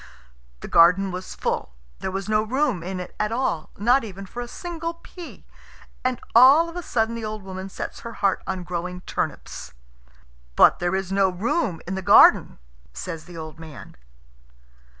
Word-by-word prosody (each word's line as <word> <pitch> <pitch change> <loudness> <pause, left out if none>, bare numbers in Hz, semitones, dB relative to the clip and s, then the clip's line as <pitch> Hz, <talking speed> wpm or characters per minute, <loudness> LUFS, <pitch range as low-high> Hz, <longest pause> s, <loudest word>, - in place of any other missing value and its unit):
The - - -7
garden 180 +3 +5
was 185 +1 -7
full. 60 - -3 0.2
There - - -3
was 195 +1 -4
no 215 0 +2
room 250 - 0
in 185 +2 -5
it 180 - -8
at 210 +1 0
all, 230 -10 -1
not 240 +6 +3
even 195 -2 -8
for 240 +6 -7
a 240 - -6
single 335 +3 -5
pea. 340 0 -12 0.6
And 255 -1 0
all 270 +8 +7
of 335 - -10
a 355 - -3
sudden 225 -7 0
the 230 -1 -5
old 215 -1 -5
woman 190 0 -7
sets - - -6
her 230 - -8
heart 200 -3 0
on 190 -2 -3
growing 180 +1 -5
turnips. 70 - -5 0.8
"But - - +6
there 175 +1 0
is 190 -1 -3
no 195 -1 +3
room 190 - -1
in 190 - -3
the 190 - -3
garden," - - +6 0.4
says 160 - -6
the 175 -1 -11
old 155 0 -8
man. 160 -3 -11
195 Hz, 175 wpm, -24 LUFS, 180-240 Hz, 0.8 s, all